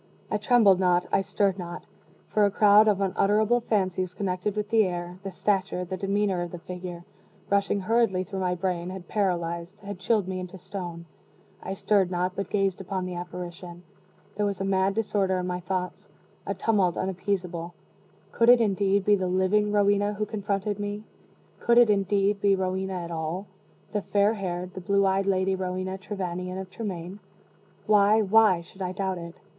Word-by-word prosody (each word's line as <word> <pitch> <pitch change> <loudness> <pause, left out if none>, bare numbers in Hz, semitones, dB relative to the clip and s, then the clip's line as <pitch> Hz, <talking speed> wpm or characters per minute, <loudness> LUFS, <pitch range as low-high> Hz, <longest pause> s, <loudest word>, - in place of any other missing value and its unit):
I 210 - 0
trembled 210 -4 +5
not 180 -1 +3
I - - +3
stirred 195 0 0
not 175 0 -7 0.4
for 210 - +2
a 205 - +5
crowd 210 +1 +6
of 200 -2 +2
unutterable 210 +4 +2
fancies 185 -5 -1
connected 190 +1 -2
with 210 0 -3
the 225 -1 +5
air, 175 0 -5
the 195 - -5
stature, 190 -1 -1
the 185 +2 -4
demeanor, 195 -1 0
of 175 - -3
the 175 - -7
figure, 180 0 -7 0.5
rushing 200 0 +2
hurriedly 215 -3 +2
through 190 +1 -6
my 180 -1 0
brain, 180 -1 -2
had 185 -2 -8
paralyzed 175 -2 -2
had 200 -2 -7
chilled 200 0 +1
me 185 -1 -3
into 185 +1 -7
stone. 175 -2 -7 0.6
I 190 - -5
stirred 195 -2 +2
not 180 0 -1
but 200 - -4
gazed 195 -2 0
upon 190 -1 -3
the 185 - -5
apparition. 175 0 -7 0.5
There 210 - 0
was 200 -1 -3
a - - -1
mad 195 0 +1
disorder 200 -4 0
in 180 - -2
my 180 0 -2
thoughts 180 0 -4 0.4
a - - -1
tumult 195 -6 +1
unappeasable. 180 -2 -3 0.6
Could 230 0 +3
it, 245 0 +8
indeed, 200 -2 +1
be 210 - +5
the 190 -2 -1
living 190 +3 +2
Rowena 205 0 +2
who 210 +1 -1
confronted 205 -1 -2
me? 205 +1 -4 0.6
Could 235 0 +3
it, 240 -3 +7
indeed, 200 0 +1
be 200 -1 +4
Rowena 190 0 -2
at 170 - -7
all 165 +4 -3 0.5
the 210 - 0
fair 205 +2 +2
haired, 180 -3 -4
the 190 - -7
blue 200 +2 +2
eyed 195 +1 +1
Lady 190 0 +2
Rowena 185 0 -3
Trevanion 185 -2 -4
of 190 -1 -7
Tremaine? 190 -3 -6 0.7
Why, 210 +1 +5
why 210 -3 +4
should 190 +3 -15
I 185 -1 -2
doubt 190 -1 -2
it? 170 0 -8
190 Hz, 180 wpm, -26 LUFS, 180-205 Hz, 0.7 s, it